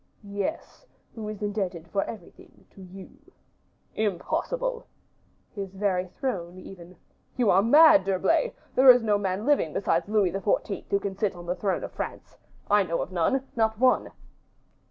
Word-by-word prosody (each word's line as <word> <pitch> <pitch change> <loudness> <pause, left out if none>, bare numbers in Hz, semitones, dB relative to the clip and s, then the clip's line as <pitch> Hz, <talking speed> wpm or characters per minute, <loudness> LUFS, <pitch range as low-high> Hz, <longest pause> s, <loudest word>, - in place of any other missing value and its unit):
"Yes, 200 - -5 0.3
who 220 -3 -7
is 210 -1 -6
indebted 190 -5 -3
for 195 +3 -1
everything 210 -7 -12
to 195 - -15
you." 190 +1 -12 0.8
"Impossible." 475 - -2 0.7
"His 195 -2 -7
very 190 -2 -1
throne, 180 -6 -5
even." 185 -1 -12 0.4
"You 240 -5 +3
are 190 - +5
mad, 265 - +6
D'Herblay. 325 - +1 0.2
There 260 +1 +6
is 250 -2 +8
no 210 -2 +2
man 195 +1 -2
living 280 - +2
besides 200 - 0
Louis 210 -4 +2
XIV. 195 +1 -2
who 200 - +1
can 200 -1 -5
sit 195 -1 -1
on 175 0 -10
the 175 +1 -2
throne 195 -1 -2
of - - -6
France. - - -7 0.3
I 205 0 +4
know 170 -3 -1
of - - -10
none, 255 +10 0
not 220 -1 +1
one." 255 +2 +2
200 Hz, 155 wpm, -26 LUFS, 185-225 Hz, 0.8 s, is